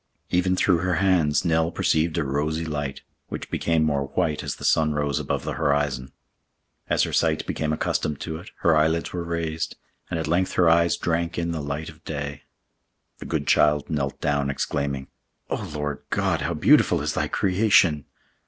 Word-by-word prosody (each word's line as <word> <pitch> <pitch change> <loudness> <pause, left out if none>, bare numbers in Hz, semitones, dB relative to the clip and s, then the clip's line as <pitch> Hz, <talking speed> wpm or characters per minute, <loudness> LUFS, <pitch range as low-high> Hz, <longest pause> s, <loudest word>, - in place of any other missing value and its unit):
Even 90 +1 +2
through 90 -2 +3
her 90 0 0
hands 80 -4 +2
Nell 80 -1 +2
perceived 80 -1 +1
a 80 - +1
rosy 75 +4 -1
light, 75 -3 -4 0.2
which - - -7
became 80 -2 +1
more 70 -3 0
white 75 +2 -1
as - - -4
the - - -7
sun 75 -1 +3
rose 75 -2 0
above - - -2
the - - -3
horizon. 70 -3 0 0.8
As - - +3
her - - -2
sight - - +1
became 75 -1 -2
accustomed 75 -1 -1
to 80 - -4
it, 90 +5 -11
her 80 - +4
eyelids 80 +2 +1
were 90 -1 -3
raised, 85 -1 -3 0.3
and 85 - -2
at 80 - -2
length 90 +3 +1
her 90 - +3
eyes 85 +1 +4
drank 85 0 -1
in 85 0 -1
the 80 -2 -3
light 70 +2 -4
of 80 +1 -15
day. 70 -2 -5 0.8
The - - -8
good - - -1
child 75 +1 +3
knelt 70 -3 -2
down, 70 -2 0
exclaiming, 70 -1 -2 0.5
"Oh - - -3
Lord 75 -1 -3
God! - - 0
how 85 +2 -1
beautiful 75 - +4
is - - -1
Thy - - 0
creation!" 95 -6 +3
80 Hz, 180 wpm, -24 LUFS, 75-85 Hz, 0.8 s, her